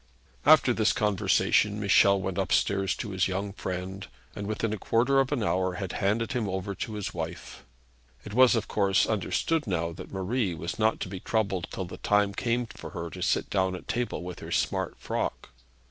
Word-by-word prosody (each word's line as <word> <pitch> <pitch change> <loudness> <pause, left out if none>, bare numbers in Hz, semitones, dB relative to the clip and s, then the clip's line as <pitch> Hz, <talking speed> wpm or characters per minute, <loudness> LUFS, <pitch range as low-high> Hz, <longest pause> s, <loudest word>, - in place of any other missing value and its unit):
After 150 -5 +7
this 110 -2 +2
conversation, 105 0 +2
Michel 100 0 +5
went 95 0 -3
upstairs 95 0 +1
to 105 - -5
his 95 -1 +1
young 100 +1 -3
friend, 95 0 -5 0.3
and 100 - -5
within 110 0 -1
a 110 - -4
quarter 130 +7 +2
of 135 0 +1
an 135 -6 0
hour 95 -2 +1
had 95 0 -4
handed 110 +5 +1
him 120 -6 -1
over 95 +1 -3
to 110 +2 -5
his 105 -2 -4
wife. 85 0 -6 0.6
It 105 - -7
was 125 +1 +6
of 115 - -1
course 100 -2 +2
understood 130 - 0
now 85 -3 -1
that 85 - -10
Marie 95 0 -1
was 85 +6 -5
not 110 +1 +2
to - - -2
be 95 0 -6
troubled 100 -4 -1
till 95 - -4
the 90 - -9
time 105 -1 +2
came 120 +3 0
for - - -10
her 85 -3 -6
to - - -8
sit - - 0
down 95 -1 +1
at - - -10
table 120 -6 -2
with 90 -1 -7
her - - -8
smart - - -1
frock. - - -3
100 Hz, 195 wpm, -28 LUFS, 95-110 Hz, 0.6 s, After